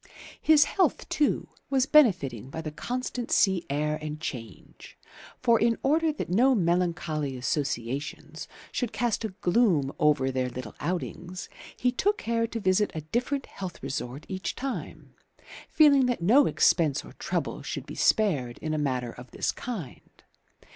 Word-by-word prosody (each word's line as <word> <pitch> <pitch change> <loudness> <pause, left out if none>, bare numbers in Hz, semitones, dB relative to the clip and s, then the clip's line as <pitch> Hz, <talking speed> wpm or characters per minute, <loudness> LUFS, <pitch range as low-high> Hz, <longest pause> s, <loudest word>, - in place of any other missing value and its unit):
His 310 -2 +6
health 380 - 0
too 295 - +1 0.2
was 265 -2 +2
benefiting 180 - +3
by 160 - -5
the 155 -1 -5
constant 245 +6 -4
sea 190 -3 +3
air 150 +2 -1
and 150 0 -5
change; 115 - -8 0.5
for, 235 -2 +5
in 230 0 +2
order 315 +3 +3
that 300 - -5
no 250 +8 +4
melancholy 170 - 0
associations 140 +3 -3 0.2
should 245 -3 -2
cast 240 -2 0
a 220 - -1
gloom 175 - +2
over 145 -3 +3
their 130 -1 -1
little 125 -3 -7
outings, 180 +1 -4 0.3
he 250 - +2
took 410 +12 +1
care 230 - 0
to 230 - -4
visit 195 +1 +2
a 155 - -3
different 245 - -2
health 185 -2 -8
resort 135 0 -4
each 190 -1 -4
time, 270 0 -6 0.6
feeling 280 -4 +5
that 245 - 0
no 235 +12 +5
expense 155 -5 +2
or - - -12
trouble - - -2
should - - -5
be - - -8
spared 145 - +1
in 155 0 -3
a 155 - 0
matter 130 -4 -1
of 125 +1 -12
this - - -1
kind. 205 - -8
175 Hz, 155 wpm, -27 LUFS, 145-245 Hz, 0.6 s, His